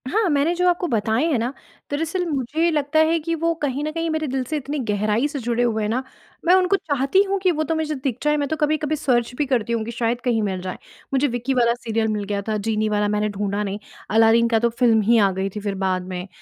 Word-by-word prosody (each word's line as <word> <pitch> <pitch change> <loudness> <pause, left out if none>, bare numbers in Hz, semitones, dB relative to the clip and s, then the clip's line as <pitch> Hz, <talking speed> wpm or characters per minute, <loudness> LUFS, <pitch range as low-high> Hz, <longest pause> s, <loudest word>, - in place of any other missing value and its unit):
हाँ, 430 +4 +1
मैंने 295 +3 +2
जो 360 +1 +2
आपको 355 0 0
बताएँ 225 +1 +1
हैं 275 - +2
ना, 240 +4 -2 0.4
दरअसल 325 +5 -1
मुझे 300 +2 0
लगता 300 0 +1
है 335 - +2
कि 330 +2 -3
वो 335 +1 0
कहीं 285 0 -1
न 305 - -2
कहीं 330 +1 -2
मेरे 315 -1 -1
दिल 265 0 -1
से 305 +5 -3
इतनी 285 +1 -4
गहराई 210 +5 +1
से 295 -1 -5
जुड़े 240 0 0
हुए 220 -2 0
हैं 210 - -1
ना, 250 +4 -1 0.4
मैं 350 - +5
उनको 375 +1 +3
चाहती 285 +1 +1
हूँ 395 0 -1
कि 370 -1 +2
वो 310 -2 -1
तो 320 +2 -1
मुझे 310 -1 -1
दिख 260 -3 -3
जाए, 300 0 +2
मैं 285 -1 -1
तो 315 - 0
कभी-कभी 305 0 0
सर्च 250 -5 0
भी 295 - +1
करती 235 -4 0
हूँ 230 -1 0
कि 235 - -5
शायद 235 +1 -1
कहीं 240 -3 +1
मिल 190 -3 -2
जाएँ। 185 0 -5 0.4
मुझे 275 +2 +3
विक्की 245 +1 -2
वाला 235 -2 +3
सीरियल 225 -2 -2
मिल 210 -1 -1
गया 200 0 -2
था, 215 -1 0
जीनी 215 +1 -1
वाला 210 0 +1
मैंने 210 0 0
ढूँढ़ा 205 0 -2
नहीं, 200 0 -4 0.3
अलादीन 225 +1 +5
का 225 -1 +3
तो 235 +1 +2
फ़िल्म 230 -2 +3
ही 230 +3 +4
आ 200 -3 +4
गई 190 +1 -2
थी - - -3
फिर 200 -1 -3
बाद 185 -1 -1
में, 180 0 -5
245 Hz, 260 wpm, -22 LUFS, 215-305 Hz, 0.4 s, मैं